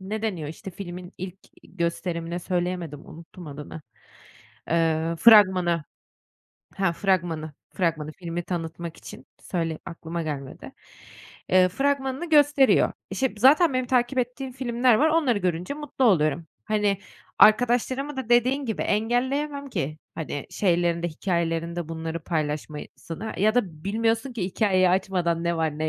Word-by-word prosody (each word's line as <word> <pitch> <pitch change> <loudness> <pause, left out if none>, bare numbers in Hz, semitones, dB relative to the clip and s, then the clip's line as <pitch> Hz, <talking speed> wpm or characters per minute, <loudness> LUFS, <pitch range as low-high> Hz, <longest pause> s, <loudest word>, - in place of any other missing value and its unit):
ne 210 +3 -5
deniyor, 175 -9 -2
işte, 175 +4 -8
filmin 180 -1 -8
ilk 185 +1 -6 0.3
gösterimine 170 -1 -3
söyleyemedim, 175 -4 -3
unuttum 165 +1 -12
adını, 150 +2 -8 0.9
ııı, 165 0 +1
fragmanı, 185 -5 +6 0.9
ha, 190 -3 +1
fragmanı, 170 -5 -1 0.2
fragmanı 155 -4 -1
filmi 175 0 -5
tanıtmak 170 -1 -5
için, - - -11 0.2
söyle, 165 -3 -2
aklıma 170 -1 -5
gelmedi. 140 -4 -6 0.8
Iıı, 185 0 +6
fragmanını 270 - -1
gösteriyor. 290 -3 +5 0.2
İşte, 265 -3 -1
zaten 275 +5 +5
benim 255 -1 0
takip 250 +1 +1
ettiğim 255 +2 -2
filmler 245 -1 +2
var, 305 +8 +4
onları 300 -9 +2
görünce 180 +6 -2
mutlu 295 -3 -2
oluyorum. 160 - +3 0.2
Hani, 210 -2 +1 0.4
arkadaşlarımı 245 +5 +4
da 260 -4 -4
dediğin 250 +4 +3
gibi 220 - -2
engelleyemem 270 +6 0
ki, 155 - -3 0.2
hani, 145 -3 -5
şeylerinde, 175 -2 +1
hikâyelerinde 170 -1 -2
bunları 165 0 -4
paylaşmasını 155 +5 -4
ya 215 +3 +3
da 180 -10 -1
bilmiyorsun 225 +5 0
ki 210 -7 -3
hikâyeyi 185 -1 +2
açmadan, 180 -3 0
ne 170 0 0
var 160 -2 -1
ne 155 0 0
185 Hz, 130 wpm, -25 LUFS, 165-240 Hz, 0.9 s, fragmanı